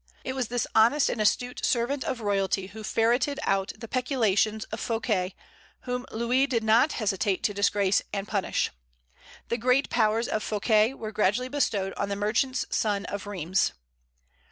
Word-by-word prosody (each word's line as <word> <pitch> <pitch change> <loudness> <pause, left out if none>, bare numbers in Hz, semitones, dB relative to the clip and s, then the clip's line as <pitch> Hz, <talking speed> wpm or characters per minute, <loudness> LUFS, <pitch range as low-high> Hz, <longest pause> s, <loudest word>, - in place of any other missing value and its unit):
It 260 - -3
was 260 -3 -2
this 245 0 -1
honest 235 +7 +4
and 220 - -2
astute 245 +4 0
servant 260 +3 0
of 240 - -3
royalty 195 -2 0
who 215 +3 -10
ferreted 240 +7 +1
out 195 0 0
the 230 - -8
peculations 220 -4 +1
of 220 - -4
Fouquet, 215 -6 -1 0.5
whom 250 0 -4
Louis 245 +4 +1
did 235 -4 0
not 225 +7 +4
hesitate 200 -2 -1
to 205 - +1
disgrace 200 -1 +2
and 200 0 -3
punish. 200 -4 -1 0.8
The 235 - -1
great 250 +3 +2
powers 225 0 +2
of 215 - -1
Fouquet 215 +3 +2
were 215 -4 -6
gradually 215 +4 +1
bestowed 220 -9 0
on 200 - -2
the 200 - -1
merchant's 235 +6 0
son 205 -2 0
of 200 0 -5
Rheims. 185 -2 0
220 Hz, 160 wpm, -27 LUFS, 200-245 Hz, 0.8 s, honest